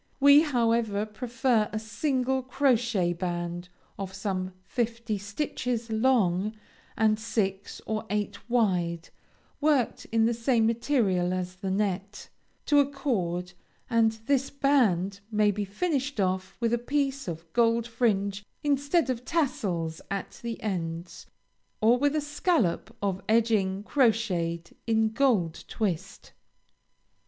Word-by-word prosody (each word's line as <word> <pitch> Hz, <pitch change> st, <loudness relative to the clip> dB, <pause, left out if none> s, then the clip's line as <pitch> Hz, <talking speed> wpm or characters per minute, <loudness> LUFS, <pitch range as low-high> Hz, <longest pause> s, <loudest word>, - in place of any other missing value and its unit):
We, 285 Hz, +1 st, +8 dB
however, 230 Hz, -7 st, +1 dB
prefer 235 Hz, 0 st, 0 dB
a 215 Hz, -, -2 dB
single 260 Hz, +4 st, -1 dB
crochet 240 Hz, -8 st, +1 dB
band 175 Hz, 0 st, -4 dB, 0.3 s
of 190 Hz, -1 st, -5 dB
some 190 Hz, -2 st, -3 dB
fifty 230 Hz, -1 st, -2 dB
stitches 230 Hz, +2 st, -3 dB
long 220 Hz, -4 st, +2 dB, 0.4 s
and 215 Hz, -1 st, +3 dB
six 200 Hz, -3 st, -2 dB
or 220 Hz, 0 st, -3 dB
eight 210 Hz, +3 st, -3 dB
wide, 180 Hz, -8 st, +1 dB, 0.5 s
worked 290 Hz, -5 st, +1 dB
in 225 Hz, 0 st, +2 dB
the 235 Hz, -, +2 dB
same 230 Hz, 0 st, +2 dB
material 220 Hz, -7 st, +1 dB
as 180 Hz, 0 st, -4 dB
the 190 Hz, +1 st, -4 dB
net, 200 Hz, +1 st, -2 dB, 0.4 s
to 290 Hz, -2 st, +4 dB
a 280 Hz, -1 st, +3 dB
cord, 180 Hz, -11 st, -2 dB, 0.4 s
and 225 Hz, -1 st, +4 dB
this 275 Hz, 0 st, +1 dB
band 220 Hz, -10 st, +2 dB
may 210 Hz, -1 st, +3 dB
be 205 Hz, 0 st, -3 dB
finished 275 Hz, -, -2 dB
off 185 Hz, -1 st, -1 dB
with 235 Hz, -1 st, +1 dB
a 240 Hz, -, +2 dB
piece 275 Hz, +1 st, -1 dB
of 165 Hz, -1 st, -5 dB
gold 230 Hz, -1 st, +3 dB
fringe 210 Hz, -4 st, 0 dB, 0.2 s
instead 285 Hz, +3 st, +2 dB
of 245 Hz, -1 st, -4 dB
tassels 185 Hz, -, -1 dB
at 195 Hz, -1 st, -5 dB
the 235 Hz, -1 st, -4 dB
ends, 170 Hz, -4 st, -4 dB, 0.5 s
or 235 Hz, +3 st, +4 dB
with 290 Hz, +2 st, +2 dB
a 305 Hz, -, +1 dB
scallop 290 Hz, -, 0 dB
of 195 Hz, -1 st, -1 dB
edging 215 Hz, -4 st, +2 dB
crocheted 205 Hz, -, 0 dB
in 220 Hz, -1 st, +3 dB
gold 215 Hz, -, +1 dB
twist. 195 Hz, -3 st, -3 dB
220 Hz, 125 wpm, -28 LUFS, 190-250 Hz, 0.5 s, We